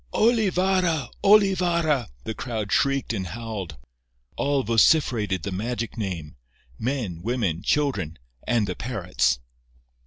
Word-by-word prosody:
"Olivarra! 185 Hz, -, +2 dB
Olivarra!" 175 Hz, -, +4 dB, 0.2 s
the 110 Hz, -, -4 dB
crowd 110 Hz, -4 st, -4 dB
shrieked 135 Hz, -3 st, +1 dB
and 95 Hz, -4 st, -3 dB
howled. 100 Hz, -6 st, -6 dB, 0.6 s
All 140 Hz, -1 st, +1 dB
vociferated 115 Hz, -, +3 dB
the 100 Hz, -, -3 dB
magic 115 Hz, +4 st, -3 dB
name—men, 85 Hz, -, -5 dB
women, 105 Hz, -6 st, -1 dB
children 100 Hz, -, 0 dB, 0.3 s
and 120 Hz, -4 st, +2 dB
the 90 Hz, -2 st, -4 dB
parrots. 90 Hz, -, 0 dB
115 Hz, 100 wpm, -25 LUFS, 95-145 Hz, 0.6 s, Olivarra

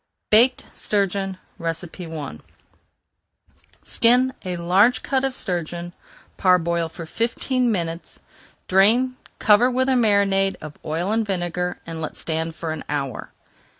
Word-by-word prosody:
BAKED 240 Hz, +4 st, +5 dB
STURGEON 195 Hz, -2 st, -1 dB, 0.3 s
I 165 Hz, -, -5 dB, 1.5 s
Skin 250 Hz, +3 st, +3 dB
a 180 Hz, -1 st, -3 dB
large 190 Hz, +8 st, +3 dB
cut 265 Hz, -1 st, 0 dB
of 270 Hz, -1 st, -1 dB
sturgeon, 175 Hz, -, -4 dB, 0.4 s
parboil 170 Hz, -2 st, +2 dB
for 165 Hz, +1 st, -8 dB
fifteen 240 Hz, +5 st, 0 dB
minutes, 170 Hz, -4 st, -4 dB, 0.5 s
drain, 230 Hz, +7 st, +4 dB, 0.2 s
cover 220 Hz, +4 st, +5 dB
with 260 Hz, +1 st, +1 dB
a 265 Hz, -, +3 dB
marinade 200 Hz, -4 st, +3 dB
of 155 Hz, -1 st, -8 dB
oil 165 Hz, +6 st, -2 dB
and 225 Hz, +1 st, +2 dB
vinegar, 180 Hz, -2 st, -2 dB
and 165 Hz, -1 st, -6 dB
let 155 Hz, -, -5 dB
stand 160 Hz, 0 st, -3 dB
for 165 Hz, -2 st, -4 dB
an 155 Hz, -1 st, -5 dB
hour. 140 Hz, -4 st, -3 dB
185 Hz, 120 wpm, -22 LUFS, 165-225 Hz, 1.5 s, BAKED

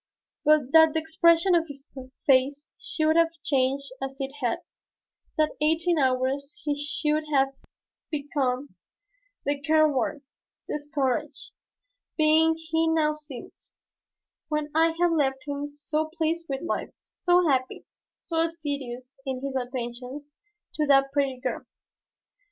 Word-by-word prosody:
But 300 Hz, -4 st, +4 dB
that 320 Hz, 0 st, +7 dB
the -, -, +3 dB
expression 335 Hz, +3 st, +3 dB
of 335 Hz, -1 st, +3 dB
his 280 Hz, -2 st, -11 dB, 0.4 s
face 275 Hz, +2 st, +2 dB
should 315 Hz, 0 st, 0 dB
have 335 Hz, 0 st, +6 dB, 0.2 s
changed 275 Hz, 0 st, +1 dB
as 270 Hz, 0 st, -4 dB
it 270 Hz, 0 st, -3 dB
had, 245 Hz, +7 st, 0 dB, 0.8 s
that 310 Hz, -1 st, +3 dB
in 300 Hz, -, +3 dB
eighteen 330 Hz, +1 st, +2 dB
hours 265 Hz, +3 st, 0 dB
he 295 Hz, -1 st, 0 dB
should 300 Hz, +1 st, 0 dB
have 270 Hz, -2 st, +4 dB, 0.6 s
become 280 Hz, -3 st, -2 dB, 0.7 s
the 285 Hz, 0 st, 0 dB
careworn, 300 Hz, -2 st, +2 dB, 0.4 s
discouraged 290 Hz, -4 st, -2 dB, 0.7 s
being 315 Hz, +1 st, +4 dB
he 325 Hz, 0 st, 0 dB
now 315 Hz, -2 st, +2 dB
seemed, 295 Hz, -5 st, -9 dB, 1.0 s
when 300 Hz, -1 st, -1 dB
I 325 Hz, +1 st, +3 dB
had 350 Hz, -1 st, +4 dB
left 270 Hz, -4 st, 0 dB
him 285 Hz, 0 st, -3 dB
so 305 Hz, +2 st, -2 dB
pleased 330 Hz, +1 st, -1 dB
with 270 Hz, +2 st, -3 dB
life, 340 Hz, -, -2 dB
so 355 Hz, -1 st, +2 dB
happy, 255 Hz, -3 st, 0 dB, 0.3 s
so 325 Hz, -1 st, -2 dB
assiduous 280 Hz, -6 st, -4 dB
in 265 Hz, -1 st, -4 dB
his 275 Hz, -1 st, -3 dB
attentions 255 Hz, +3 st, -5 dB, 0.4 s
to 305 Hz, -1 st, 0 dB
that 275 Hz, -1 st, +5 dB
pretty 275 Hz, -2 st, 0 dB
girl. -, -, -3 dB
290 Hz, 130 wpm, -26 LUFS, 270-320 Hz, 1.0 s, that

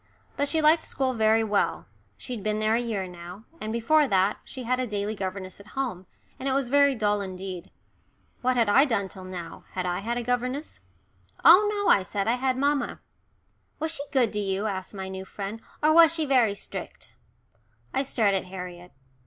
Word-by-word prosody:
But 285 Hz, 0 st, 0 dB
she 320 Hz, -1 st, +1 dB
liked 315 Hz, +2 st, +5 dB
school 265 Hz, -1 st, -1 dB
very 220 Hz, -1 st, +3 dB
well, 210 Hz, -2 st, 0 dB, 0.3 s
she'd 245 Hz, -5 st, -6 dB
been 215 Hz, +1 st, -1 dB
there 215 Hz, 0 st, +2 dB
a 235 Hz, -, +2 dB
year 220 Hz, -5 st, -2 dB
now, 180 Hz, +3 st, -10 dB, 0.2 s
and 215 Hz, -, -3 dB
before 280 Hz, +7 st, +3 dB
that 195 Hz, -1 st, +2 dB
she 260 Hz, -, -8 dB
had 250 Hz, +2 st, 0 dB
a 255 Hz, -, -1 dB
daily 205 Hz, 0 st, -2 dB
governess 190 Hz, -2 st, -5 dB
at 205 Hz, +5 st, -15 dB
home, 190 Hz, -10 st, -3 dB, 0.3 s
and 270 Hz, -, -2 dB
it -, -, +1 dB
was 270 Hz, -2 st, 0 dB
very 280 Hz, 0 st, +4 dB
dull 210 Hz, -2 st, +1 dB
indeed. 185 Hz, -2 st, -6 dB, 0.7 s
What 255 Hz, 0 st, +1 dB
had 230 Hz, -2 st, +3 dB
I 270 Hz, +8 st, +6 dB
done 200 Hz, -8 st, -1 dB
till 185 Hz, 0 st, -10 dB
now 175 Hz, -3 st, -8 dB
had 185 Hz, -1 st, -2 dB
I 180 Hz, 0 st, -1 dB
had 235 Hz, +4 st, -2 dB
a 245 Hz, -, -2 dB
governess? 250 Hz, +4 st, -2 dB, 0.7 s
"Oh 405 Hz, +5 st, +8 dB
no," 410 Hz, -1 st, -1 dB
I 200 Hz, -, +5 dB
said. 195 Hz, +2 st, -3 dB
"I 235 Hz, +2 st, +2 dB
had 260 Hz, 0 st, 0 dB
mamma." 285 Hz, +1 st, 0 dB, 0.8 s
"Was 320 Hz, +1 st, -1 dB
she 305 Hz, -, -2 dB
good 250 Hz, -5 st, +2 dB
to 210 Hz, -, -1 dB
you," 195 Hz, 0 st, -1 dB
asked 195 Hz, -1 st, -4 dB
my 190 Hz, -1 st, -5 dB
new 190 Hz, 0 st, -6 dB
friend, 200 Hz, +3 st, -6 dB, 0.2 s
"or 310 Hz, +1 st, +5 dB
was 330 Hz, -1 st, +8 dB
she 325 Hz, -2 st, -1 dB
very 245 Hz, -7 st, +3 dB
strict?" -, -, -7 dB, 0.8 s
I -, -, +1 dB
stared 225 Hz, -7 st, +1 dB
at 190 Hz, -1 st, 0 dB
Harriet. 180 Hz, -1 st, -9 dB
220 Hz, 200 wpm, -26 LUFS, 195-265 Hz, 0.8 s, Oh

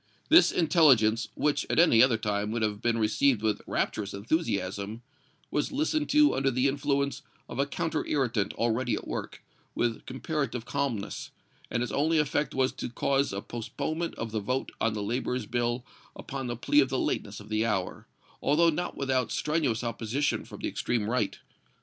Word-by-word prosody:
This 330 Hz, -, +7 dB
intelligence, 130 Hz, -10 st, +4 dB
which, 150 Hz, -1 st, +1 dB
at -, -, 0 dB
any 160 Hz, -10 st, +6 dB
other 125 Hz, -3 st, +5 dB
time, 105 Hz, -1 st, -1 dB
would 115 Hz, 0 st, -1 dB
have 105 Hz, -1 st, -1 dB
been 120 Hz, -1 st, +1 dB
received 110 Hz, +2 st, +2 dB
with 110 Hz, -1 st, 0 dB
rapturous 100 Hz, -2 st, -2 dB
enthusiasm, 100 Hz, -, -2 dB, 0.5 s
was 150 Hz, -, 0 dB
listened 305 Hz, +1 st, 0 dB
to 300 Hz, 0 st, +5 dB
under 135 Hz, 0 st, +1 dB
the 130 Hz, +1 st, +2 dB
influence 140 Hz, -1 st, 0 dB, 0.3 s
of 120 Hz, -, -7 dB
a 140 Hz, -, +2 dB
counterirritant 135 Hz, -8 st, -1 dB
already 115 Hz, 0 st, 0 dB
at -, -, -7 dB
work, -, -, -5 dB, 0.3 s
with 120 Hz, -2 st, -1 dB
comparative 130 Hz, -3 st, -3 dB
calmness, 120 Hz, -9 st, -3 dB, 0.4 s
and 120 Hz, -, 0 dB
its 125 Hz, -, -4 dB
only 160 Hz, +3 st, +2 dB
effect 150 Hz, 0 st, 0 dB
was 130 Hz, 0 st, +2 dB
to -, -, -5 dB
cause 135 Hz, +3 st, +1 dB
a 100 Hz, +1 st, -4 dB
postponement 140 Hz, +8 st, -4 dB
of 115 Hz, -1 st, -5 dB
the 110 Hz, -, -1 dB
vote 125 Hz, +6 st, -2 dB
on 115 Hz, -, +2 dB
the 105 Hz, -, -3 dB
laborers' 125 Hz, +2 st, -2 dB
bill 120 Hz, +2 st, -1 dB, 0.3 s
upon 135 Hz, -2 st, -5 dB
the 120 Hz, -1 st, -3 dB
plea 145 Hz, +4 st, +3 dB
of 135 Hz, -2 st, +4 dB
the 130 Hz, -, -1 dB
lateness 100 Hz, -4 st, -2 dB
of 105 Hz, 0 st, -12 dB
the 110 Hz, 0 st, +1 dB
hour, 105 Hz, -5 st, -2 dB, 0.3 s
although 165 Hz, +4 st, +4 dB
not 175 Hz, +3 st, -3 dB
without 130 Hz, -3 st, 0 dB
strenuous 150 Hz, -7 st, 0 dB
opposition 120 Hz, +4 st, -1 dB
from -, -, -11 dB
the -, -, -1 dB
extreme 115 Hz, -4 st, -1 dB
right. 115 Hz, -5 st, 0 dB
125 Hz, 175 wpm, -28 LUFS, 110-140 Hz, 0.5 s, This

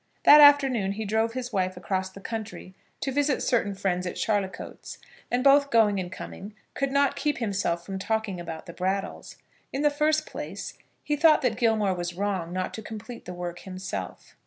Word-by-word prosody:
That 300 Hz, 0 st, +9 dB
afternoon 270 Hz, -9 st, +6 dB
he 220 Hz, +2 st, -4 dB
drove 220 Hz, +2 st, 0 dB
his 250 Hz, -1 st, -5 dB
wife 185 Hz, -2 st, 0 dB
across 185 Hz, +1 st, -2 dB
the 190 Hz, -, -12 dB
county 220 Hz, -4 st, -6 dB, 0.3 s
to 270 Hz, -, -1 dB
visit 290 Hz, 0 st, +1 dB
certain 205 Hz, -5 st, +1 dB
friends 180 Hz, -2 st, -1 dB
at -, -, -4 dB
Charlicoats, 205 Hz, -3 st, -3 dB, 0.3 s
and, 245 Hz, +1 st, 0 dB
both 280 Hz, 0 st, +5 dB
going 215 Hz, -5 st, +4 dB
and 180 Hz, -1 st, -5 dB
coming, 200 Hz, +2 st, -8 dB, 0.2 s
could 275 Hz, 0 st, -1 dB
not 280 Hz, 0 st, +2 dB
keep 295 Hz, 0 st, -1 dB
himself 195 Hz, -6 st, -1 dB
from 195 Hz, -1 st, -5 dB
talking 220 Hz, -2 st, -2 dB
about 165 Hz, -2 st, -7 dB
the 170 Hz, -, -9 dB
Brattles. 190 Hz, +2 st, -3 dB, 0.4 s
In 275 Hz, -, -2 dB
the 295 Hz, -, +4 dB
first 310 Hz, +1 st, +1 dB
place, -, -, -6 dB, 0.3 s
he 295 Hz, -, 0 dB
thought 310 Hz, 0 st, +5 dB
that 245 Hz, -3 st, +1 dB
Gilmore 220 Hz, -4 st, +2 dB
was 175 Hz, -1 st, -4 dB
wrong 190 Hz, -3 st, -2 dB
not 185 Hz, 0 st, -3 dB
to 220 Hz, -, -6 dB
complete 220 Hz, +2 st, -9 dB
the 180 Hz, -, -6 dB
work 175 Hz, 0 st, -5 dB
himself. 185 Hz, -, -7 dB
210 Hz, 185 wpm, -26 LUFS, 185-255 Hz, 0.4 s, That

